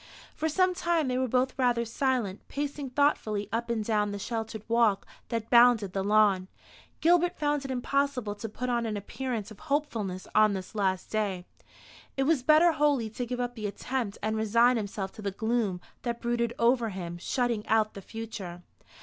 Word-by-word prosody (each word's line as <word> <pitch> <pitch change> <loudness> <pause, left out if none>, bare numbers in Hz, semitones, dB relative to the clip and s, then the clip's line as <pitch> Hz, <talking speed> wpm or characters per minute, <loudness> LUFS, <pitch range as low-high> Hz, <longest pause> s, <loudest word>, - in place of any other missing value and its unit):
For 320 - -1
some 370 +3 +3
time 340 -4 0
they 250 0 0
were 260 - +1
both 255 +2 +1
rather 240 -2 +2
silent, 235 -4 -1
pacing 285 -1 -4
thoughtfully 245 -7 +1
up 235 +1 -2
and 225 -2 -1
down 210 -2 +1
the 205 - -4
sheltered 220 0 -4
walk 230 -4 +3 0.2
that 230 -2 -3
bounded 235 -5 +6
the 195 - -1
lawn. 205 -2 +3 0.5
Gilbert 350 +1 +3
found 290 -2 0
it - - -5
impossible 260 -3 0
to 220 +2 -6
put 250 +4 -4
on 235 -2 0
an 215 -1 -2
appearance 225 +1 -4
of 215 - -12
hopefulness 235 -11 -2
on 215 -1 +5
this 190 +2 -7
last 190 -3 -1
day. 200 -5 -1 0.7
It 270 - +2
was 295 -1 +2
better 310 +6 +6
wholly 285 -8 +1
to 245 +2 -4
give 250 +1 -3
up 245 0 -2
the 215 -3 -4
attempt, 225 +1 -3
and 220 0 0
resign 230 +3 +4
himself 200 -3 -3
to - - -11
the 200 - -1
gloom 220 -2 -1 0.2
that 235 -1 -3
brooded 235 -1 -1
over 235 -1 +3
him, 175 -3 -6
shutting 235 +2 -1
out 220 -1 +2
the 195 - -8
future. 195 -5 -7
230 Hz, 185 wpm, -28 LUFS, 210-260 Hz, 0.7 s, bounded